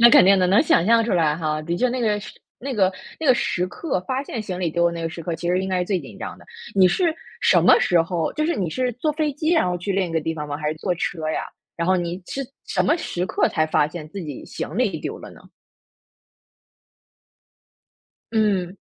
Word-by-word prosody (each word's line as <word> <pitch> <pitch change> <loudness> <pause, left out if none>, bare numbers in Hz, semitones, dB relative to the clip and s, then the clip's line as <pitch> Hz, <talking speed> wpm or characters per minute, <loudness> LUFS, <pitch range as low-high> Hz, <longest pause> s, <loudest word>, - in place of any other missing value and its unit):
那 235 - +10
肯 - - +8
定 195 +1 +6
的， 185 - +3
能 195 +7 +5
想 180 - +3
象 230 +1 +5
出 230 - -1
来 160 -4 +2
哈。 155 -2 -1
的 170 +2 -2
确 250 +7 +2
那 250 +1 -2
个 210 -3 +1
时 205 - -9 0.3
那 270 +2 -4
个 190 -3 +3 0.3
那 320 - -3
个 260 - +7
时 180 -6 0
刻， 185 - -3
发 260 +1 -1
现 240 -5 -5
行 190 -4 -5
李 175 -3 0
丢 170 +2 +2
了 170 - +1
那 170 0 -5
个 165 - -1
时 165 0 -8
刻， 170 0 -3
其 170 +2 -4
实 180 +1 +2
应 190 - -3
该 185 -1 0
是 180 - 0
最 190 0 0
紧 130 -9 -12
张 - - -6
的。 - - -17 0.3
你 190 -2 +6
是 330 - +2 0.3
什 - - +5
么 - - +7
时 175 -2 +3
候， 165 -1 -1
就 305 +1 0
是 340 - +1
你 180 -5 -1
是 250 +6 -1
坐 300 +6 0
飞 305 -1 -1
机， 310 +3 -1
然 325 - +3
后 180 - -1
去 180 +3 -3
另 190 -1 +1
一 - - -7
个 165 - +1
地 160 +1 -2
方 150 -2 -5
吗？ 145 0 -4
还 150 0 -2
是 155 - -2
坐 180 +3 -1
车 160 -2 -3
呀？ - - -1 0.3
然 170 - -1
后 185 +1 +4
你 175 +1 -3
是 275 - -4 0.2
什 - - 0
么 310 - +3
时 180 - -3
刻 - - +1
才 155 -1 +1
发 150 -1 +2
现 155 -1 -8
自 195 +5 -7
己 150 -5 -7
行 - - -6
李 - - +1
丢 - - -5
了 - - -10
呢？ - - -15 2.9
嗯。 200 -4 +1
185 Hz, 275 characters per minute, -23 LUFS, 165-230 Hz, 2.9 s, 那